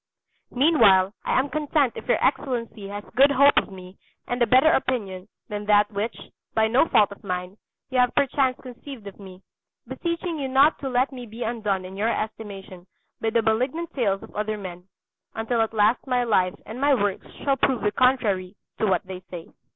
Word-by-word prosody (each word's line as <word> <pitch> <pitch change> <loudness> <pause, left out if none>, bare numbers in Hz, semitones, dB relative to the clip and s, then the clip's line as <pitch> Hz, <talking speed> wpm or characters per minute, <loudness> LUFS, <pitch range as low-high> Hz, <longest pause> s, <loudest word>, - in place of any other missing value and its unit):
Meanwhile, 220 - +4
I - - 0
am 260 +2 +2
content 295 -4 +1
if - - -9
your 245 - +3
Excellency 235 -6 -2
has 205 +1 -6
good 275 +3 +6
hope 280 +1 +5
of - - +1
me 185 0 -12 0.3
and 245 0 -3
a 240 - +4
better 265 +5 +5
opinion 210 - -2 0.2
than 210 -1 -5
that 210 0 +4
which, 210 +3 -3 0.4
by 220 0 +3
no 250 +8 +3
fault 210 -8 +3
of 200 - -12
mine, 180 0 -4 0.3
you 255 - +1
have 250 -1 +2
perchance 270 -2 +1
conceived 255 -2 -10
of 200 0 -10
me; 190 -1 -12 0.4
beseeching 335 -1 -3
you 275 - -2
not 270 +4 +4
to 270 - -4
let 255 +2 +1
me 250 -2 -8
be 225 +3 -6
undone 210 -5 -2
in 185 +1 -9
your 210 +3 0
estimation 200 -5 -6 0.3
by 225 - +1
the 230 0 +1
malignant 255 +10 -1
tales 200 -7 0
of - - -14
other 215 +1 -2
men, 180 -3 -8 0.5
until 225 +1 0
at 225 - 0
last 220 +4 +2
my 250 -1 +1
life 185 -6 +1
and 225 +5 -8
my 285 0 +4
works 205 -4 -2 0.2
shall 275 -1 +1
prove 265 -3 +1
the 210 - +2
contrary 210 -7 +1 0.2
to 215 - +1
what 190 - +1
they 185 -1 -7
say. 170 -2 -8
225 Hz, 195 wpm, -24 LUFS, 200-260 Hz, 0.5 s, good